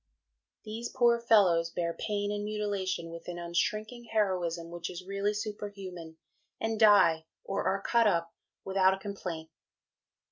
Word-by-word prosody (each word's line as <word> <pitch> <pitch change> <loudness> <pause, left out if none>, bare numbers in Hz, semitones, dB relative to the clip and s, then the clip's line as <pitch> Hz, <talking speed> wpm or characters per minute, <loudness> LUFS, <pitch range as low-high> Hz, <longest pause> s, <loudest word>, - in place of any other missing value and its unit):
These 225 +2 -5
poor 240 -2 +3
fellows 190 -8 +4
bear 170 0 -2
pain 205 +1 -2
and 205 0 -2
mutilation 200 -5 -2
with 165 0 -9
an 175 -1 -5
unshrinking 215 +7 -2
heroism 180 -6 -1
which 170 0 -5
is 180 0 -8
really 200 +1 0
superhuman, 195 -6 -6 0.4
and 225 -1 -1
die, 170 -7 +6 0.2
or 195 +1 -2
are 195 +1 0
cut 235 -2 +4
up 170 -4 +1 0.3
without 190 0 +3
a - - -12
complaint. 180 -6 -6
195 Hz, 140 wpm, -30 LUFS, 170-210 Hz, 0.4 s, die